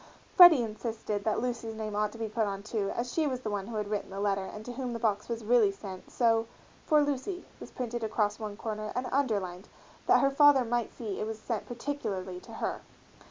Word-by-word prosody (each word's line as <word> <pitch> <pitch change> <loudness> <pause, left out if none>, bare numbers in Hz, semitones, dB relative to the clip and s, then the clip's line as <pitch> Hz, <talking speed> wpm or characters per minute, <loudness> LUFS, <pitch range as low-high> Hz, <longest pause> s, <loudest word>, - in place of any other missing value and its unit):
Freddie 350 -9 +10
insisted 220 -2 -4
that 215 0 +1
Lucy's 235 -2 -3
name 215 -1 -4
ought 210 0 +1
to 230 - -11
be 225 -1 -2
put 215 0 0
on, 200 0 -4
too, 210 -2 -2
as 245 +1 -3
she 315 -2 +2
was 255 -2 -2
the 215 - -3
one 200 -1 -3
who 235 - -6
had 210 -1 -2
written 210 0 -3
the 195 0 -6
letter 195 -1 0
and 210 +2 -8
to 245 - -6
whom 250 -1 -4
the 230 - -4
box 210 -2 0
was 230 -1 -3
really 225 -3 +5
sent; 195 -2 -9
so 225 -2 +2 0.4
"For 300 -2 +5
Lucy" 290 +6 -3
was - - -9
printed 240 -2 -4
across 215 -1 0
one 210 -2 -5
corner 215 -1 -4
and 250 +1 -1
underlined 200 -9 -1 0.4
that - - +6
her 275 - +3
father 280 -2 +6
might 240 0 -1
see 215 -5 -5
it 215 - -2
was 220 0 -4
sent 220 0 -4
particularly 215 -8 -4
to - - -13
her. - - -3
225 Hz, 225 wpm, -30 LUFS, 210-245 Hz, 0.4 s, Freddie